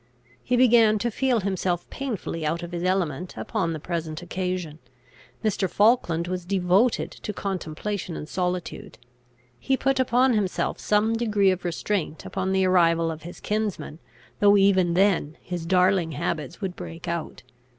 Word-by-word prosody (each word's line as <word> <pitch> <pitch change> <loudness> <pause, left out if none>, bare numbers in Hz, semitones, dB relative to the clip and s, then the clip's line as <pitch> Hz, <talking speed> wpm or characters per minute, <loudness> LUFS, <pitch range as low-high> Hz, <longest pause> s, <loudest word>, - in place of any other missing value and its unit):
He 250 - 0
began 230 -3 +5
to 235 +3 -1
feel 250 -1 +1
himself 185 -2 -1
painfully 215 -11 -4
out 165 +3 -1
of 170 - -7
his 175 0 -4
element 180 -3 -1
upon 190 -7 -2
the 160 - -4
present 165 0 -4
occasion. 180 -3 -3 0.7
Mr. 200 -3 +1
Falkland 200 -7 +2
was 180 0 -3
devoted 190 +5 +2
to - - -6
contemplation 190 -1 -4
and 150 - -7
solitude. 180 0 -3 0.6
He 265 -1 0
put 270 0 +1
upon 255 0 +3
himself 205 -4 -1
some 210 +2 +2
degree 210 -4 +2
of 185 -1 -3
restraint 175 -1 -2
upon 190 0 -2
the 190 0 +2
arrival 165 -3 +3
of 160 0 -7
his 175 +3 -10
kinsman, 210 -7 -3 0.4
though 205 0 +6
even 190 -3 +3
then 180 -5 +2
his 175 -2 -6
darling 180 -2 +3
habits 155 +4 -3
would 190 -3 -3
break 165 +2 -8
out. 170 -2 -4
185 Hz, 150 wpm, -25 LUFS, 170-210 Hz, 0.7 s, though